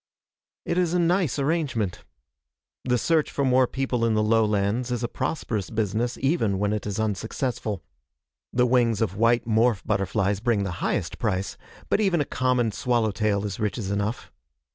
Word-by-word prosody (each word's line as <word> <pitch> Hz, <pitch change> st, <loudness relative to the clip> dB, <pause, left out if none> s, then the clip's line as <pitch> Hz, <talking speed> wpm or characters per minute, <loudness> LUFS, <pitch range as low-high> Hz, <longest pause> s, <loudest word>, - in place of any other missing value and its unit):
It 170 Hz, -, 0 dB
is 175 Hz, -1 st, +1 dB
a -, -, +3 dB
nice 175 Hz, -, +2 dB
arrangement. 135 Hz, -, -1 dB, 0.8 s
The 125 Hz, -1 st, +1 dB
search 160 Hz, +4 st, +1 dB
for 140 Hz, -, -1 dB
more 130 Hz, 0 st, +4 dB
people 130 Hz, -3 st, -1 dB
in 115 Hz, -1 st, +2 dB
the 105 Hz, -, +2 dB
lowlands 110 Hz, +1 st, +1 dB
is 120 Hz, -1 st, -2 dB
a -, -, +1 dB
prosperous 120 Hz, -, -3 dB
business 110 Hz, +2 st, -1 dB
even 135 Hz, -, +1 dB
when 105 Hz, +1 st, 0 dB
it 105 Hz, -1 st, -3 dB
is 105 Hz, 0 st, -3 dB
unsuccessful. 110 Hz, 0 st, -2 dB, 0.7 s
The 125 Hz, 0 st, +3 dB
wings 120 Hz, -3 st, +2 dB
of 105 Hz, -4 st, -1 dB
white 115 Hz, +2 st, +3 dB
morph 110 Hz, -1 st, +2 dB
butterflies 100 Hz, 0 st, 0 dB
bring 115 Hz, -2 st, +1 dB
the 100 Hz, -, -3 dB
highest -, -, -1 dB
price, 95 Hz, -1 st, -1 dB, 0.3 s
but -, -, +2 dB
even 190 Hz, -5 st, +2 dB
a 145 Hz, -, +1 dB
common 125 Hz, -4 st, +1 dB
swallow 115 Hz, 0 st, +1 dB
tail 105 Hz, -1 st, 0 dB
is 100 Hz, -3 st, -4 dB
riches 105 Hz, -1 st, -2 dB
enough. 105 Hz, +3 st, -2 dB
115 Hz, 165 wpm, -25 LUFS, 105-130 Hz, 0.8 s, more